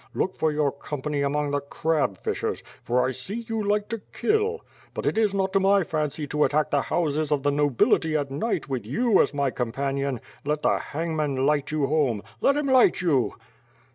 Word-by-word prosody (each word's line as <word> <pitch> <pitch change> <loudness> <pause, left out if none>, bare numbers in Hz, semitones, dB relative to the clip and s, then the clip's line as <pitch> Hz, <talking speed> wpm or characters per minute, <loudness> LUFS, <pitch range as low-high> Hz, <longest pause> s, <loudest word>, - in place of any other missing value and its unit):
Look 185 - 0
for 160 - 0
your 150 -2 +1
company 145 +1 -4
among 145 +1 0
the 145 - +1
crab 145 - -1
fishers, - - -3 0.2
for 125 +1 +1
I - - -1
see 200 - -5
you 225 -1 -2
like 205 0 +1
to 230 -2 -4
kill; 440 +2 0 0.3
but - - -4
it - - +1
is 220 -2 +3
not 190 -1 -1
to 195 - +4
my 195 0 +4
fancy 155 -1 -2
to 150 +1 +1
attack 150 +1 +1
the 140 - +3
houses 155 -2 -1
of 145 -2 +1
the 145 - +2
nobility 145 +2 +2
at 140 -2 -3
night 155 +10 -2
with 130 -5 -3
you 225 - +3
as - - +1
my 140 -2 0
companion. 135 +2 -2 0.2
Let 150 +1 -1
the - - +3
hangman 150 -4 -2
light 145 -1 +1
you 150 -2 0
home! 135 -8 +1 0.2
Let 280 - +3
him 295 - 0
light 260 -7 +4
you!" 145 -9 +1
150 Hz, 200 wpm, -25 LUFS, 140-190 Hz, 0.3 s, to